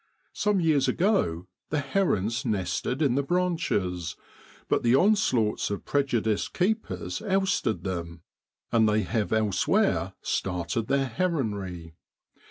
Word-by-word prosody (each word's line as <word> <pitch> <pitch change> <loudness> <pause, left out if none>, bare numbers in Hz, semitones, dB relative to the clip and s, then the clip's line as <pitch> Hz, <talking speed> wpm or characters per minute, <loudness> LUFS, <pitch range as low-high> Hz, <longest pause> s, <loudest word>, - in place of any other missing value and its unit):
Some 210 -2 +1
years 155 -5 +3
ago 165 - +1 0.2
the 155 - -1
herons 130 - 0
nested 105 - -1
in 135 -4 +3
the 140 - +2
branches, 120 - -1 0.5
but - - +1
the 120 +1 +4
onslaughts 180 - +2
of 100 - -4
prejudiced 120 -7 0
keepers 215 +5 -1
ousted 190 - 0
them, 85 -3 -5 0.5
and 110 -2 +4
they 105 0 +2
have 110 +2 -1
elsewhere 110 -3 +1
started 90 +4 -2
their 135 0 +2
heronry. 105 - -2
115 Hz, 115 wpm, -27 LUFS, -, 0.5 s, the